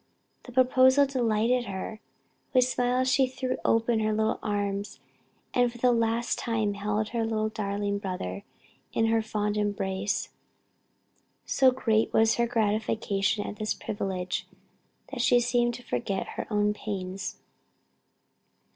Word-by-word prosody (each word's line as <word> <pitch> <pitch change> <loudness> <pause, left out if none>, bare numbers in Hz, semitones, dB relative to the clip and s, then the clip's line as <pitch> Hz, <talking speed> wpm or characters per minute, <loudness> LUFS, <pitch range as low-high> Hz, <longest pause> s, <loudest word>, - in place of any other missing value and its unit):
The 250 - -10
proposal 260 +2 +5
delighted 240 -2 +1
her; 200 +2 -5 0.6
with 255 - +7
smiles 250 0 +1
she 260 0 +4
threw 255 0 -3
open 230 0 +2
her 215 0 +1
little 220 +1 0
arms 205 -1 -2 0.5
and 245 -1 +3
for 240 - -12
the 250 +1 +3
last 230 0 0
time 220 -3 0
held 210 +1 -1
her 230 -1 -1 0.3
darling 200 -1 -2
brother 180 - -4 0.5
in 225 - +2
her 225 0 +2
fond 210 -1 -2
embrace. 200 -1 -1 1.2
So 265 -1 +4
great 225 -4 +1
was 220 0 +4
her 235 0 +2
gratification 215 -2 0
at 210 - -6
this 215 0 -1
privilege, 185 -3 -3 0.6
that 265 -3 -3
she 245 0 +5
seemed 240 0 +1
to 245 - -10
forget 190 - -2
her - - -5
own 210 -1 +2
pains. 195 -2 -5
220 Hz, 130 wpm, -28 LUFS, 205-245 Hz, 1.2 s, with